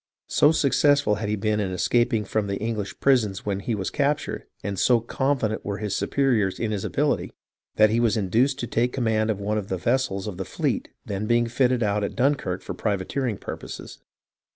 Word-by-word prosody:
So 145 - +5
suc 140 -4 +2
cessful 145 -8 +3
had 105 -2 -2
he 105 - +1
been 105 +1 0
in 100 -3 -1
escaping 115 +4 +1
from 105 +1 -1
the 100 0 -2
English 110 -3 -4
prisons 110 -8 +2
when 100 -2 -1
he 110 +3 -2
was 95 -2 -3
captured, 145 +1 -1 0.2
and 100 -2 -3
so 120 -2 +4
confident 120 -2 -1
were 100 -1 -3
his 105 -1 -2
superiors 120 -9 +1
in 110 -2 -1
his 100 -3 -2
ability, - - 0 0.4
that 110 0 +5
he 115 - +2
was 115 -1 +2
induced 115 +7 +2
to - - -1
take 120 +2 0
command 110 -4 +1
of 105 -2 -1
one 105 +2 -1
of 100 - -7
the 95 - -2
vessels 105 -1 0
of 105 -4 -5
the 95 - -3
fleet - - -2 0.2
then 100 +1 -3
being 120 0 +3
fitted 125 0 +1
out 105 0 +1
at 100 - -3
Dun 135 +3 +3
kirk 95 -9 -4
for - - -5
privateering 105 +3 -2
purposes. - - -8
110 Hz, 205 wpm, -25 LUFS, 100-125 Hz, 0.4 s, So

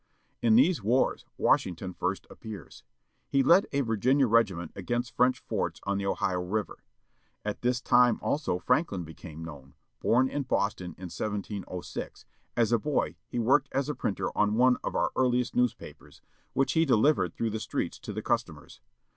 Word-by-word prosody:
In 225 -2 +4
these 185 - +4
wars 120 +6 +1
Washington 90 +1 +1
first 95 +2 -2
appears. 110 -3 -10 0.5
He 135 -1 +3
led 175 +8 +5
a 140 - +1
Virginia 130 +4 +2
regiment 105 -7 +2
against 120 +5 -3
French 125 +1 +3
forts - - -3
on 100 0 -1
the 100 - -2
Ohio 90 -2 0
River. 100 +4 -3 0.7
At 105 -1 -3
this 125 0 +1
time 125 -2 +4
also 145 - -1
Franklin 95 - 0
became 80 0 -9
known, 70 -3 -11 0.3
bom 130 +3 +3
in 145 - -2
Boston 100 - -1
in 90 -2 -8
1706, 100 -3 -5 0.3
as 115 -2 +3
a 120 - +4
boy 145 +6 -1
he - - -6
worked 130 +4 +3
as 140 +2 -1
a - - 0
printer 110 -6 -3
on 105 0 +2
one 125 +2 +4
of - - -3
our - - +1
earliest 125 -1 +1
newspapers, 125 -2 -2 0.3
which 135 +1 +1
he 160 - +4
delivered 140 +1 +3
through 115 -1 -1
the 110 - -3
streets - - -3
to - - -7
the - - -5
customers. - - -3
115 Hz, 165 wpm, -28 LUFS, 100-130 Hz, 0.7 s, led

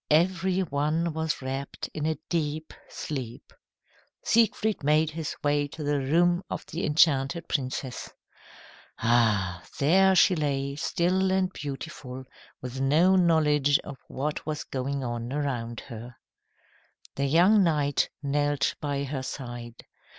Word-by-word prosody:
Every 180 +4 +2
one 155 +1 0
was 160 -3 -2
wrapped 135 +1 -4
in 155 0 -2
a 160 -2 -1
deep 155 -2 -2 0.2
sleep. 130 -6 -6 0.7
Siegfried 220 -4 +2
made 155 +2 +3
his 160 -1 -4
way 145 0 +2
to 150 +2 -8
the 145 0 +1
room 175 +6 +2
of - - -5
the 165 - -5
enchanted 150 +1 +3
princess. 130 -2 -3 0.9
Ah! 105 -7 +2
there 190 +6 +4
she 185 - +5
lay, 140 -3 -1
still 185 +5 +1
and 190 -1 +1
beautiful, 135 -2 -7 0.4
with 130 +1 -5
no 160 +8 +4
knowledge 150 -5 +4
of 135 -3 -9
what 145 +3 -3
was 155 0 -3
going 135 +1 -3
on 120 0 -4
around 125 -5 -3
her. 120 -1 -9 1.0
The 140 - -1
young 180 +8 +5
knight 145 -5 +1
knelt 145 0 +1
by 140 -1 -1
her 135 -1 -3
side. 120 -3 -7
145 Hz, 130 wpm, -27 LUFS, 135-165 Hz, 1.0 s, she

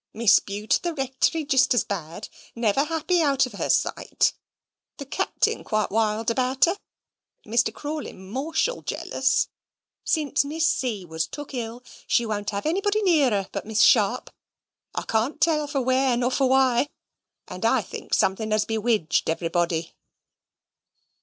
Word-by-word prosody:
Mrs. 225 -1 +4
Bute 205 +2 0
at - - -18
the 345 -2 -3
Rectory 270 +3 0
jist 265 -3 +3
as 245 - +3
bad 175 0 -6 0.3
never 230 +4 +1
happy 330 +2 0
out 280 -4 +3
of 255 - -9
her - - -3
sight. - - +1 0.6
The 280 - -7
Capting 275 - -1
quite 215 -2 -1
wild 220 +1 +1
about 255 +2 +2
her. 345 +3 0 0.7
Mr. 230 +1 +1
Crawley 295 +5 -5
mortial 270 - -2
jealous. 265 0 0 0.6
Since 300 -4 +1
Miss 315 +3 0
C. 225 - -1
was 160 -1 -3
took 290 -1 -8
ill, 240 0 -5 0.2
she 235 - +2
won't 205 -2 -3
have 200 -1 -4
nobody 405 +6 +1
near 315 -8 +4
her 200 -3 -1
but - - -5
Miss 220 -1 +1
Sharp, 230 +2 +4 0.6
I - - -2
can't 230 +8 -1
tell 305 -2 +2
for 285 -2 -1
where 260 0 +2
nor 245 +1 0
for 265 0 +2
why; 265 0 +3 0.6
and - - -8
I - - +3
think - - -4
somethink 215 +3 0
has 215 -1 +2
bewidged 220 -8 0
everybody." 165 0 -1
245 Hz, 155 wpm, -24 LUFS, 215-290 Hz, 0.7 s, Mrs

